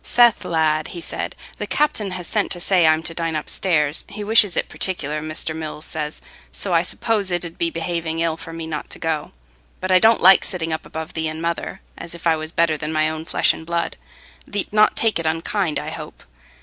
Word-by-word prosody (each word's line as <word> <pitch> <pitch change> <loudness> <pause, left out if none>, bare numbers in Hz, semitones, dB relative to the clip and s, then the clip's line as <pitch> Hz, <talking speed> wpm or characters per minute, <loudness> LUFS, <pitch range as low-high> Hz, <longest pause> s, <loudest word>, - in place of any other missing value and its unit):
"Seth, 240 -2 +4
lad," 155 -2 +1
he 175 - -7
said, - - -4 0.2
"the - - -3
captain 295 -9 0
has 180 -1 -5
sent 210 +3 0
to 175 - -7
say 175 -2 +4
I'm 155 0 +3
to 165 - 0
dine 165 -1 -2
upstairs—he 155 +4 0
wishes 210 -3 +5
it - - +1
particular, 155 -5 -1
Mr. 155 +1 0
Mills 155 -1 -4
says, 150 -1 -4 0.3
so - - -1
I - - +5
suppose 215 -4 0
it 175 -1 0
'ud 165 - -9
be 170 - +1
behaving 165 -1 -3
ill 165 -1 +1
for 165 +1 -9
me 165 0 -6
not 155 -2 -5
to - - -2
go. 160 -2 -2 0.5
But 185 0 -2
I 185 - +7
don't 225 +3 +5
like 190 +2 +7
sitting 165 -4 -2
up 160 - -4
above 160 +1 -6
thee 160 -1 -2
and 155 0 -5
mother, 170 0 -3 0.2
as 170 +1 -6
if 170 - -11
I 165 -1 +4
was 155 0 -6
better 165 -2 +2
than 150 +1 -4
my 155 0 +2
own 160 0 -6
flesh - - +2
and - - -9
blood. 170 +1 -2 0.5
Thee't 205 0 -4
not 215 0 +5
take 225 -5 +2
it 165 - -1
unkind, 165 +1 0
I - - -4
hope?" - - -9
165 Hz, 220 wpm, -21 LUFS, 160-185 Hz, 0.5 s, I